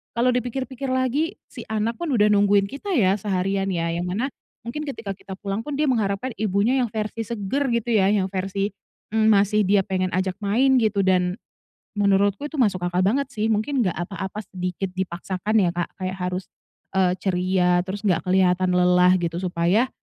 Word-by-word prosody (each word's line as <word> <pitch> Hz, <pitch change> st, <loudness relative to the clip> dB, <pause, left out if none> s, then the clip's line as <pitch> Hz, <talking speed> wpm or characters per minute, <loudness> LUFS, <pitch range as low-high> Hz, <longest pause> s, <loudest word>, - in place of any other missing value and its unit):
kalau 245 Hz, +2 st, +3 dB
dipikir-pikir 255 Hz, +2 st, -3 dB
lagi 260 Hz, +7 st, 0 dB, 0.2 s
si 245 Hz, -, -8 dB
anak 220 Hz, +1 st, -2 dB
pun 345 Hz, -2 st, -3 dB
udah 210 Hz, -1 st, +4 dB
nungguin 205 Hz, 0 st, +4 dB
kita 280 Hz, -, -7 dB
ya, 200 Hz, -5 st, +3 dB
seharian 195 Hz, 0 st, -1 dB
ya, 170 Hz, -2 st, -1 dB
yang 175 Hz, +1 st, -2 dB
mana 230 Hz, +10 st, -2 dB, 0.3 s
mungkin 240 Hz, +6 st, -4 dB
ketika 230 Hz, -7 st, -5 dB
kita 190 Hz, 0 st, -10 dB
pulang 200 Hz, +1 st, -3 dB
pun 290 Hz, +4 st, -5 dB
dia 305 Hz, -, +2 dB
mengharapkan 225 Hz, 0 st, 0 dB
ibunya 215 Hz, +5 st, +2 dB
yang 245 Hz, -, +1 dB
versi 215 Hz, +1 st, -3 dB
seger 235 Hz, +6 st, -1 dB
gitu 235 Hz, +1 st, -1 dB
ya? 200 Hz, -4 st, +4 dB
Yang 200 Hz, -2 st, +2 dB
versi, 195 Hz, +1 st, -2 dB, 0.5 s
mmm, 220 Hz, 0 st, +3 dB
masih 210 Hz, 0 st, +4 dB
dia 200 Hz, 0 st, +4 dB
pengen 185 Hz, -1 st, -1 dB
ajak 185 Hz, 0 st, 0 dB
main 255 Hz, +6 st, +3 dB
gitu, 210 Hz, -2 st, +1 dB
dan 180 Hz, 0 st, +2 dB, 0.6 s
menurutku 200 Hz, +3 st, +2 dB
itu 295 Hz, -1 st, -3 dB
masuk 190 Hz, -7 st, +1 dB
akal 175 Hz, +1 st, 0 dB
banget 270 Hz, +5 st, +1 dB
sih. 215 Hz, +1 st, -1 dB
Mungkin 225 Hz, +6 st, 0 dB
enggak 185 Hz, -7 st, 0 dB
apa-apa 190 Hz, +4 st, -5 dB
sedikit 180 Hz, 0 st, -4 dB
dipaksakan 190 Hz, +3 st, -2 dB
ya, 175 Hz, -, +2 dB
Kak, 175 Hz, 0 st, -2 dB, 0.2 s
kayak 185 Hz, +1 st, -3 dB
harus, 180 Hz, +1 st, -2 dB, 0.5 s
eee, 185 Hz, -1 st, +2 dB
ceria, 180 Hz, -1 st, +1 dB
terus 200 Hz, +2 st, -5 dB
enggak 180 Hz, -5 st, +2 dB
kelihatan 180 Hz, -1 st, +3 dB
lelah 180 Hz, 0 st, +5 dB
gitu. 170 Hz, -1 st, -2 dB
Supaya, 185 Hz, +6 st, +1 dB
200 Hz, 180 wpm, -23 LUFS, 185-230 Hz, 0.6 s, lelah